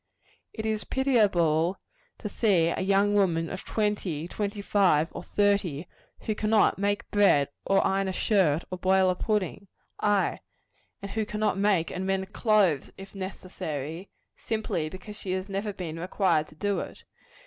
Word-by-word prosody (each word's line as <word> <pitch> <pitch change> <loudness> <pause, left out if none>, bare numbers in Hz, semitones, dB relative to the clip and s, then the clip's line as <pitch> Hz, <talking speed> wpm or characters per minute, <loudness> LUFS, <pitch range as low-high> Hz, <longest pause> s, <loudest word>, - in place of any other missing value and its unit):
It 220 - -6
is 220 -1 -1
pitiable 190 - +2 0.4
to - - -5
see 190 -6 +2
a - - -2
young 200 +2 +3
woman 170 -5 +2
of 190 - -6
twenty, 205 -7 -1
twenty 205 +2 -3
five 180 -6 +3
or - - -7
thirty, 200 -6 0 0.3
who 215 - -1
cannot 215 -1 +2
make 205 +1 0
bread, 195 -9 +4 0.2
or 195 0 +3
iron 195 0 +1
a - - -1
shirt, 180 -6 +2
or 185 - -4
boil 190 0 +3
a - - -2
pudding 200 -1 -2 0.3
ay, 205 -2 +1 0.6
and 200 - -6
who 220 - -1
cannot 210 -1 -1
make 195 -5 +2
and 185 +1 -3
mend 195 0 -2
clothes, 205 - +2
if 195 0 -11
necessary 180 -4 -6 0.3
simply 215 -8 -2
because 200 +4 -10
she 185 - -3
has 185 +1 -3
never 200 +1 -3
been 170 -4 -6
required 180 -3 +1
to - - -17
do 200 +4 -1
it. - - -8
195 Hz, 160 wpm, -27 LUFS, 175-205 Hz, 0.6 s, bread